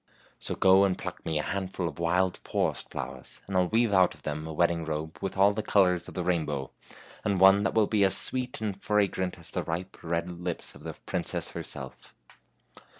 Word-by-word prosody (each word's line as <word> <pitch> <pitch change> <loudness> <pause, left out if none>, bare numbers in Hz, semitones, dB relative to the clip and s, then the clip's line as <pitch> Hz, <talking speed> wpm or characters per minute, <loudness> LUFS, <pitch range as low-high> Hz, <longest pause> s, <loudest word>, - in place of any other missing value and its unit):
So - - -3
go 95 +1 +6
and 95 -2 +1
pluck - - -7
me 80 - 0
a 75 - 0
handful 95 -2 -2
of 80 -1 -7
wild 90 +2 +1
forest - - -2
flowers, - - -6
and 95 - -5
I'll 90 -1 +3
weave 115 +1 +2
out 95 -3 +4
of 75 - -21
them 75 +1 -4
a - - -5
wedding 85 +1 +1
robe 80 0 -4
with 95 - -4
all 100 +1 +6
the 105 +1 -2
colors 90 -5 +2
of - - -10
the 90 - -1
rain 85 -2 +1
bow, 70 -3 -4 0.5
and 100 -3 0
one 95 +1 +7
that 100 - -1
will 110 -1 +5
be 105 -1 +2
as 95 - +5
sweet 125 -2 +2
and 105 -3 -2
as 100 - -24
fra 105 -1 +3
grant 95 -1 -3
as - - -5
the - - -1
ripe, 90 +3 -5
red 85 +1 -2
lips 90 0 -5
of - - -14
the - - -5
princess - - -2
herself." 65 -2 -8
90 Hz, 220 wpm, -28 LUFS, 85-100 Hz, 0.5 s, one